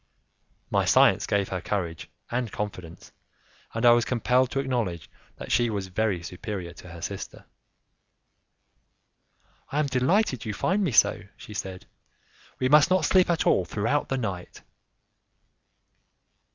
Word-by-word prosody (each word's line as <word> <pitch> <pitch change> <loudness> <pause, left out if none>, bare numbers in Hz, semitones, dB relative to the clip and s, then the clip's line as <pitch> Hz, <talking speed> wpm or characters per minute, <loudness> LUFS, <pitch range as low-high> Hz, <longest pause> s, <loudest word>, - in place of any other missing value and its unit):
My - - +2
science - - +4
gave 100 -1 0
her 90 -1 -3
courage 85 -5 -3 0.2
and 120 -2 -2
confidence, 90 -5 -7 0.6
and 115 +1 0
I 120 - +9
was 120 0 +4
compelled 125 +1 +1
to 135 - -2
acknowledge 120 -11 -2 0.3
that - - -8
she 120 +1 +3
was 100 -3 -4
very 95 -2 -1
superior 90 0 -6
to 90 - -13
her 85 0 -10
sister. - - -6 2.3
"I 145 - -2
am 150 - +2
delighted 130 - +1
you 105 -2 -4
find 190 - 0
me 175 - 0
so," 110 - +4 0.2
she 105 - -11
said; 95 -2 -6 0.7
"we 130 - 0
must 150 +4 +6
not 185 0 +2
sleep 185 -1 +4
at 170 -2 +1
all 95 - +3
throughout 115 +10 -1
the 135 - 0
night." 95 -7 -5
110 Hz, 140 wpm, -26 LUFS, 95-130 Hz, 2.3 s, I